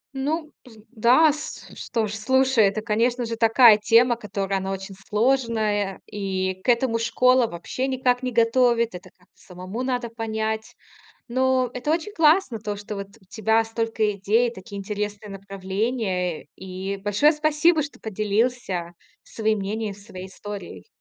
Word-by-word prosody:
Ну 300 +3 -2 0.4
да, 255 +7 +5 0.4
что 225 -2 -2
ж, 210 - -5
слушай, 260 +1 +3
это, 205 +2 -1
конечно 235 +3 0
же, 230 0 -3
такая 225 -1 +6
тема, 235 +3 +4
которая, 195 -3 -3
она 190 +1 -4
очень 195 +1 -6 0.2
сложная, 215 -4 0
и 190 -2 -3
к - - -2
этому 235 -1 +2
школа 250 +1 +3
вообще 175 +10 -4
никак 255 -1 +1
не 250 -1 -2
готовит. 235 0 +3
Это 180 - -10
как 180 - -27
самому 185 +6 -8
надо 250 -2 -2
понять. 220 -1 -3 0.5
Но 255 0 +1
это 275 +5 -1
очень 340 +5 -2
классно 310 - +3
то, 210 -1 -4
что 205 +1 -7
вот 200 0 -6
у - - -23
тебя 220 +2 +2
столько 225 -1 -1
идей, 215 +5 +1
такие 200 -1 -9
интересные 205 +1 -4
направления. 195 -2 -3
И 190 +1 -5
большое 205 +10 +3
спасибо, 310 +1 +2
что 290 - -9
поделился 210 -4 -1 0.3
своим 220 -1 -1
мнением, 210 +2 -3
и 200 - -7
своей 190 -2 -10
историей. 200 - -9
220 Hz, 145 wpm, -24 LUFS, 200-250 Hz, 0.5 s, такая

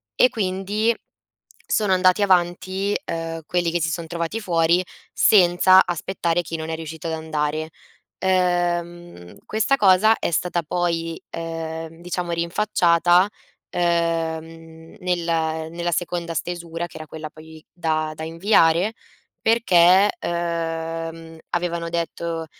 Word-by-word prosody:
E 250 - +5
quindi, 205 +2 0 0.7
sono 205 -3 +2
andati 185 +2 +3
avanti, 185 +2 +1
ehm, 165 0 -4
quelli 175 -2 0
che 175 -1 -1
si 160 - +1
son 165 +1 -3
trovati 170 +6 -3
fuori 170 -2 +2 0.3
senza 185 -1 +6
aspettare 175 0 -1
chi 165 +1 -5
non 160 0 -5
è 160 - -2
riuscito 160 0 -7
ad 165 - -2
andare. 155 -1 -2 0.5
Ehm, 175 - -1
questa 220 +6 +1
cosa 210 0 +5
è - - -1
stata 175 +1 0
poi, 165 0 -2
ehm, 165 0 -6
diciamo 175 0 -4
rinfacciata, 175 0 +3 0.4
uhm, 165 -1 -2
nella 165 -3 -1
nella 170 +1 -3
seconda 170 0 -2
stesura 170 -1 -4
che 165 - -13
era 155 - -8
quella 155 0 -7
poi 160 0 -14
da 155 -2 -1
da 160 - -8
inviare 170 +3 +3 0.5
perché, 195 -3 +5
ehm, 165 -1 -4
avevano 170 -1 -2
detto 170 -1 -3
170 Hz, 120 wpm, -22 LUFS, 165-180 Hz, 0.7 s, senza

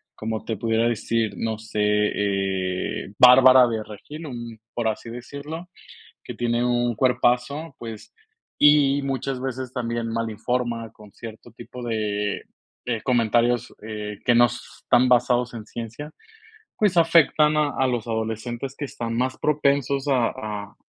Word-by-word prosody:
como 110 0 -4
te 110 - -4
pudiera 115 +2 +1
decir, 115 -1 -1
no 110 -1 -2
sé, 110 -1 -6
eh, 100 -3 -1
Bárbara 130 0 +8
de 115 -2 -2
Regil, 145 +10 -10
un 120 -4 -8
por 115 -2 0
así 110 +2 -5
decirlo, 140 +8 -8 0.6
que - - -7
tiene 120 0 0
un 120 -1 +1
cuerpazo, 130 +5 +1
pues, 115 -2 -9 0.4
y 145 -1 +5
muchas 135 -1 -3
veces 130 -1 -4
también 120 -2 -3
mal 115 0 -2
informa 115 +1 -2
con 105 -2 -16
cierto 115 +1 -11
tipo 125 +1 -10
de 105 -2 -2 0.4
de 115 -3 -2
comentarios, 120 -1 +1
eh, 105 -1 -6
que 120 - +4
no 120 +1 +7
s 120 0 -6 0.2
están 125 +1 +3
basados 125 0 +2
en 110 -2 -8
ciencia, 115 +7 -7 0.7
pues, 205 -4 +2
afectan 160 -2 +4
a 150 -1 +2
a 130 - +2
los 120 -2 -2
adolescentes 115 +4 -4
que 150 - -3
están 115 -3 -5
más 130 +2 -1
propensos 140 -2 +1
a 125 -4 +3
a 105 -4 -6
120 Hz, 145 wpm, -24 LUFS, 110-130 Hz, 0.7 s, Bárbara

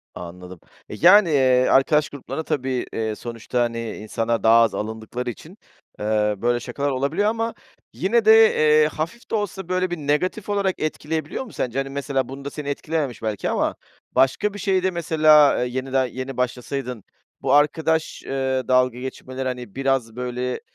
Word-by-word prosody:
Anladım. 90 +1 -9 0.3
E, - - -6
yani, 185 - +6
eee, 130 -3 +3
arkadaş 150 +3 +3
gruplarında 140 +2 -6
tabii, 130 -5 -2
eee, 110 -1 -2
sonuçta, 120 +2 -4
hani, 115 -2 -2
insanlar 115 +2 -2
daha 115 +1 +6
az 115 - +2
alındıkları 110 +3 -4
için, 160 - -10 0.4
eee, 105 0 +1
böyle 120 +3 +1
şakalar 135 +4 -3
olabiliyor 140 +10 0
ama 230 +1 -2 0.4
yine 220 +4 +1
de, 220 - +8 0.2
eee, 155 0 +4
hafif 165 +10 -6
de - - +1
olsa 195 -4 -4
böyle 185 0 0
bir 175 - -2
negatif 155 +8 -1
olarak 200 -2 0
etkileyebiliyor 155 - -3
mu 230 - -13
sence? 125 0 -3
Hani, 135 0 -3
mesela 135 -2 -2
bunda 135 +1 -6
seni 145 -1 -6
etkilememiş 145 -4 -3
belki 110 -3 -2
ama - - 0 0.4
başka 165 +10 +2
bir 205 - -8
şeyde 190 -1 +1
mesela, 155 -5 +4
eee, - - -4
yenide 130 0 -1
yeni 130 0 -6
başlasaydın 125 -2 -3 0.4
bu - - +1
arkadaş, 160 +2 +1
eee, 130 -1 -1
dalga 125 -1 +2
geçmeleri, 130 0 -5
hani, 125 -5 -6
biraz 135 -4 0
böyle, 125 0 -3
135 Hz, 160 wpm, -22 LUFS, 120-160 Hz, 0.4 s, de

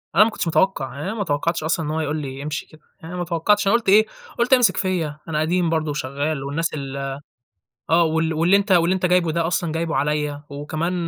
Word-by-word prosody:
أنا 215 - +8
ما 225 - +2
كنتش 180 - -4
متوقع، 160 -3 +1
يعني 145 - -6
أنا - - -3
ما 210 -3 -2
توقعتش 160 +1 -1
أصلًا 160 0 0
إن 150 - -3
هو 160 - -1
يقول 155 0 -1
لي 135 0 -6
امشي 150 0 -4
كده، 155 -1 -19 0.2
يعني 165 +2 -9
أنا 180 - -4
ما 175 - -2
توقعتش، 195 +5 +1
أنا 230 - +5
قُلت 230 -5 0
إيه، 215 +2 +6 0.3
قُلت 245 +3 +3
هيمسك 240 -7 +4
فيَّ، 175 -6 -1
أنا 155 -2 -1
قديم 170 +1 +1
برضو 160 -2 0
وشغّال 140 +1 -2
والناس 155 +4 -2
ال 140 -2 -5 0.9
آه، 170 +1 +5
وال 160 0 0
واللي 170 +5 +3
أنت 200 0 -1
واللي 175 +1 +4
أنت 185 -1 -1
جايبه 180 -2 +3
ده 165 0 0
أصلًا 170 -2 -1
جايبه 165 0 -2
عليَّ 150 0 -1
وكمان 155 +5 -3
165 Hz, 235 wpm, -22 LUFS, 150-180 Hz, 0.9 s, أنا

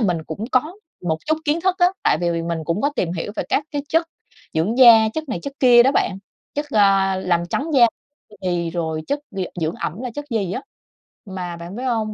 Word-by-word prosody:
mình 180 -7 +1
cũng 160 +7 -5
có 305 +8 +1 0.3
một 160 -3 -1
chút 315 - +2
kiến 310 +2 +1
thức 370 0 +2
á, 355 - +6 0.2
tại - - +3
vì 170 -1 0
mình 170 0 -2
cũng 170 +6 -1
có 285 - +2
tìm 170 -2 0
hiểu 180 +4 -4
về - - 0
các 285 - +1
cái 290 -1 -3
chất 330 +1 +2 0.5
dưỡng 195 +10 0
da, 225 -3 +8
chất 310 +6 -5
này 240 - -2
chất 280 - -5
kia 245 -2 +7
đó 270 +3 +3
bạn, 190 - 0 0.4
chất, 290 +1 -2
ờ, 195 -3 +3
làm 175 -2 +1
trắng 310 +4 -2
da, 240 -3 +7 0.4
ư, 210 - -17
thì 175 -2 -1
rồi 160 -2 -3
chất 285 - -1
d 195 - -9 0.2
dưỡng 160 +1 -1
ẩm 175 +8 -5
là 250 - -4
chất 290 - -5
gì 200 -6 -1
á. 255 - -4 0.6
Mà 180 -3 -6
bạn 170 +3 -8
biết 245 - -5
hông, 225 -4 -1
210 Hz, 230 wpm, -21 LUFS, 175-265 Hz, 0.6 s, da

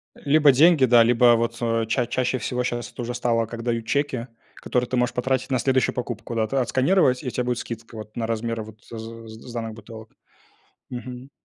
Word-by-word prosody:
Либо 145 0 +4
деньги, 155 +1 +5
да, 120 -2 +6
либо 120 +1 +5
вот, 115 0 -1
э, 115 -1 0
ча 120 +2 0
чаще 130 +2 -1
всего 125 +2 -2
щас 120 -1 -3
тоже 120 0 -5
стало, 115 -2 +1
как 115 +1 -7
дают 115 -1 -1
чеки, 135 -2 -1 0.3
которые 125 -1 -2
ты 130 - -1
можешь 125 0 +1
потратить 130 +1 -1
на 130 - +2
следующую 130 +1 +1
покупку, 120 -2 -5
да, 110 - +2
отсканировать, 130 - +2
и - - -7
у - - -1
тя 125 - -1
будет 125 -1 -1
скидка 115 -1 -7
вот 110 0 -10
на 115 -1 -1
размер 115 0 -2
вот 110 0 -13
з 115 - -10
з 115 0 -10
сданных 115 -2 -5
бутылок. 110 0 -11 0.8
Мгм. 125 +1 -7
120 Hz, 200 wpm, -24 LUFS, 115-125 Hz, 0.8 s, да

